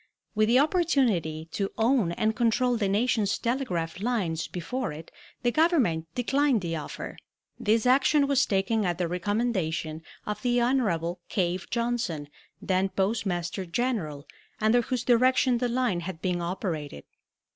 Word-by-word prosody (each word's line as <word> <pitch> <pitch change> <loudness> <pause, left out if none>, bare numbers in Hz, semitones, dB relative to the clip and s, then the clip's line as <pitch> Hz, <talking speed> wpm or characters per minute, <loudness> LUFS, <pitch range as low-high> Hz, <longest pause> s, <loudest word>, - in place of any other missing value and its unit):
With 215 0 +2
the 240 +3 +4
opportunity 255 - +1
to 195 -1 -2
own 225 -5 +2
and 220 +4 0
control 240 +2 +2
the 215 -4 0
nation's 210 -1 +1
telegraph 185 -10 -2
lines 200 -9 -1
before 220 +5 -3
it 155 +2 -10 0.3
the 240 - +3
Government 250 - +2
declined 270 -1 +2
the 165 -2 -3
offer. 150 -2 -6 0.4
This 220 +2 +2
action 280 +3 +4
was 280 -1 +2
taken 205 +3 +1
at 175 -3 0
the 180 -1 0
recommendation 180 -4 -1 0.2
of 210 0 -4
the 245 -1 +2
Hon. 200 -9 +1
Cave 180 -1 -1
Johnson, 235 -11 -2 0.3
then 190 0 0
Postmaster 190 -2 -1
General, 170 - -2 0.3
under 220 +3 +4
whose 250 0 -2
direction 255 0 +3
the 245 0 0
line 240 -7 0
had 175 -1 -6
been 175 0 -1
operated. 170 - -4
210 Hz, 140 wpm, -27 LUFS, 175-245 Hz, 0.4 s, the